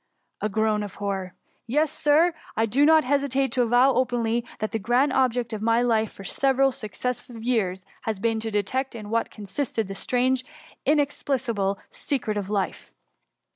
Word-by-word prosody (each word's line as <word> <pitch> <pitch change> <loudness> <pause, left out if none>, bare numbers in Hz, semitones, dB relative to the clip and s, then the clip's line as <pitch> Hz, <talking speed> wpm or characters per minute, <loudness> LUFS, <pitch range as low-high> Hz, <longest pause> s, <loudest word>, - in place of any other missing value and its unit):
^^ - - -49 0.4
(a 210 - +1
groan 215 +1 +1
of 205 -2 -6
horror.) 195 -3 -3 0.2
" - - -44
Yes, 305 -1 +3
Sir, 315 +4 +3 0.2
I 225 - +3
do 270 +7 +3
not 315 -1 +6
hesitate 275 -1 +1
to 255 0 +1
avow 245 +3 +4
openly, 240 -2 +1
that 215 - -3
the 225 - -1
grand 245 +6 +2
object 245 -3 +1
of 215 - -4
my 230 +2 +3
life, 220 -3 +1
for 195 - -11
several 270 +6 +2
successive 235 0 -5
years, 195 -7 0 0.2
has 220 -2 0
been 225 +2 0
to 225 0 -3
detect 235 +6 -1
in 215 -2 -7
what 230 0 +1
consisted 220 +1 -3
the 195 - -5
strange, 255 +5 +1 0.4
inexplicable 260 -8 +1
secret 255 -7 -2
of 200 -2 -3
life. 200 -2 -2
235 Hz, 175 wpm, -25 LUFS, 215-265 Hz, 0.4 s, not